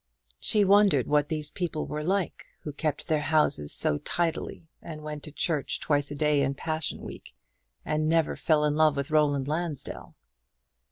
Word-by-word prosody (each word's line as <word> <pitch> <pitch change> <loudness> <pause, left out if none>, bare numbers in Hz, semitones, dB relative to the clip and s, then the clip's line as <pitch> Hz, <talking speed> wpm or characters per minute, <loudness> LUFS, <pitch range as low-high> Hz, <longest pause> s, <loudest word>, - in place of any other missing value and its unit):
She 210 -2 +2
wondered 195 - +5
what 150 0 +2
these 150 -2 -3
people 170 -4 -3
were 150 0 -4
like, 190 +2 -1 0.2
who 150 - -6
kept 150 0 -2
their 155 -3 +1
houses 150 - +1
so 75 - +1
tidily, 170 -1 -2
and 155 -2 -8
went 150 -1 -6
to 150 - -9
church 150 -1 -1
twice 145 -2 0
a 145 - -5
day 150 -1 +2
in 135 0 0
Passion 155 +1 -3
week, - - -10 0.5
and 155 0 0
never 165 -1 +2
fell 150 -2 +2
in 150 0 +1
love 155 -1 +4
with 140 +2 -3
Roland 145 -3 +2
Lansdell. 155 -1 -4
150 Hz, 170 wpm, -27 LUFS, 145-160 Hz, 0.5 s, wondered